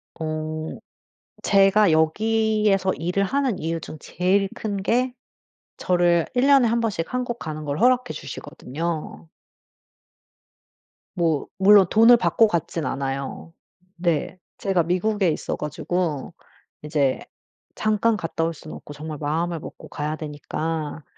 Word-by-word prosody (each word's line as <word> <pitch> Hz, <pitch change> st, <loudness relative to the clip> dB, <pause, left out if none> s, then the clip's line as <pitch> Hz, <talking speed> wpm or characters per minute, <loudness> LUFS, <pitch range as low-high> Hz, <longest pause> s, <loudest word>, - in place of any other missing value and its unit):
어 155 Hz, 0 st, -4 dB, 0.7 s
제가 195 Hz, -1 st, +5 dB
여기에서 210 Hz, +3 st, +2 dB
일을 180 Hz, +4 st, -1 dB
하는 265 Hz, 0 st, 0 dB
이유 165 Hz, +1 st, -2 dB
중 155 Hz, -, -8 dB
제일 195 Hz, +2 st, +1 dB
큰 205 Hz, -2 st, -3 dB
게 250 Hz, +5 st, +1 dB, 0.7 s
저를 175 Hz, -2 st, +2 dB
1 250 Hz, +2 st, +2 dB
년에 275 Hz, -4 st, +6 dB
1 235 Hz, +1 st, +1 dB
번씩 215 Hz, -4 st, -2 dB
한국 245 Hz, -1 st, -2 dB
가는 155 Hz, -1 st, -5 dB
걸 145 Hz, +1 st, -3 dB
허락해 250 Hz, 0 st, +3 dB
주시거든요. 145 Hz, -, -6 dB, 1.9 s
뭐 165 Hz, -4 st, 0 dB
물론 195 Hz, -1 st, +7 dB
돈을 230 Hz, +2 st, +7 dB
받고 180 Hz, +5 st, +3 dB
갔진 165 Hz, -4 st, -2 dB
않아요. 135 Hz, +4 st, -4 dB, 0.4 s
네. 170 Hz, 0 st, -1 dB, 0.2 s
제가 190 Hz, -4 st, +1 dB
미국에 185 Hz, +2 st, +1 dB
있어 155 Hz, -, -2 dB
가지고 150 Hz, 0 st, -3 dB, 0.5 s
이제 145 Hz, -3 st, +1 dB, 0.6 s
잠깐 215 Hz, +1 st, +1 dB
갔다 165 Hz, -3 st, -3 dB
올 165 Hz, +1 st, 0 dB
순 155 Hz, +1 st, -11 dB
없고 145 Hz, -, -10 dB
정말 150 Hz, +1 st, -7 dB
마음을 165 Hz, +3 st, -1 dB
먹고 -, -, -10 dB
가야 150 Hz, +1 st, -3 dB
되니까 155 Hz, +1 st, -4 dB
175 Hz, 230 characters per minute, -23 LUFS, 155-210 Hz, 1.9 s, 물론